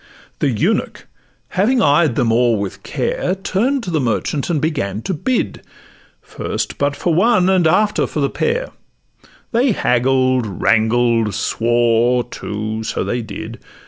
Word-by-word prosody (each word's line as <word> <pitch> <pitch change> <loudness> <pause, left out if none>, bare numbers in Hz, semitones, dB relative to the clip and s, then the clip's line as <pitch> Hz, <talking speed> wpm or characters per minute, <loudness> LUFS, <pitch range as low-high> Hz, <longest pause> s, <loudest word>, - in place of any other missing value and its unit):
The - - +1
eunuch, - - -1 0.4
having 225 +7 +1
eyed 150 -3 +3
them 120 -5 +1
o'er 120 -1 +3
with 100 -1 -5
care, 185 - -2
Turn'd 235 +8 -1
to 180 - -4
the 160 - +1
merchant, 130 +5 -1
and 165 -3 +1
begun 125 - -2
to 190 - -2
bid 245 - -2 0.6
First - - -4
but 145 0 +1
for 170 +4 -1
one, 190 +1 +3
and 180 -4 +3
after 210 +6 +2
for - - -4
the 140 - +2
pair; 475 - -1 0.8
They 245 +1 +2
haggled, 130 - +1
wrangled, 110 +1 +1
swore, 120 +1 +2
too—so 110 -1 -4
they 120 - -2
did! 110 +1 -8
135 Hz, 140 wpm, -18 LUFS, 115-185 Hz, 0.8 s, eyed